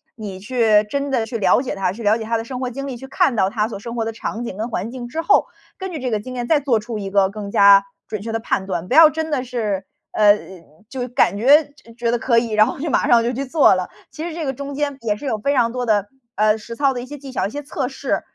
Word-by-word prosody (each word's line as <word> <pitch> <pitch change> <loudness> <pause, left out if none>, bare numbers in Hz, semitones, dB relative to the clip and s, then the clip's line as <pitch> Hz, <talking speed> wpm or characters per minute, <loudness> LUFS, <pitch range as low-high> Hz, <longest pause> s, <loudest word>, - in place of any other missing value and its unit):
你 205 -4 -7
去 215 0 +3
真 280 +4 -2
的 245 -4 0
去 230 +1 -5
了 225 +5 +3
解 260 - -3
他， 195 -2 -1
去 230 +3 -9
了 210 +1 +4
解 220 - -5
他 230 +1 0
的 225 - -5
生 255 +1 -6
活 255 - -2
经 275 +3 -6
历， 270 - -5
去 265 +3 -10
看 270 -2 +1
到 190 -2 +2
他 215 0 -1
所 220 - -7
生 235 +3 -7
活 225 -1 -1
的 225 - -2
场 225 +1 -5
景 230 - -5
跟 220 +4 -4
环 215 0 -3
境 245 -1 -7
之 320 +7 -4
后， 405 - +4 0.3
根 380 -1 -5
据 325 - -5
这 250 -2 -3
个 215 - 0
经 255 +4 -8
验 240 -1 -3
再 310 -3 +4
做 260 -5 +1
出 215 0 -6
一 195 -1 -5
个 195 -1 +3
更 205 0 -7
加 200 0 +7 0.2
准 215 -2 -5
确 225 +2 -5
的 225 - -1
判 195 -3 -1
断， 180 -2 -4
不 - - -1
要 315 +1 +9
真 320 0 -4
的 285 -4 0
是， 215 -6 -3 0.3
呃， 210 -1 +5 0.5
就 255 -2 -4
感 235 -4 +2
觉 290 +6 +5 0.3
觉 235 0 0
得 240 - 0
可 235 0 +2
以， 230 -1 -3
然 215 0 +4
后 - - -4
就 315 +3 -3
马 - - +1
上 235 -1 +5
就 240 - 0
去 265 +3 -3
做 275 -4 +4
了。 185 -1 -2 0.2
其 310 - -9
实 340 - -6
这 335 - -4
个 270 - -1
中 280 +2 -6
间 285 -1 -2
也 215 -3 0
是 210 - -13
有 230 -5 -1
非 280 +7 0
常 235 -3 +2
多 250 0 -3
的， 205 -3 +1 0.3
呃， 215 +1 +3
实 230 +2 -9
操 275 +2 +2
的 245 - -4
一 - - -7
些 290 +3 -9
技 275 -1 -10
巧， 255 - -1
一 - - -7
些 290 +5 -6
测 275 -3 -3
试， 270 0 -2
235 Hz, 315 characters per minute, -20 LUFS, 215-270 Hz, 0.5 s, 要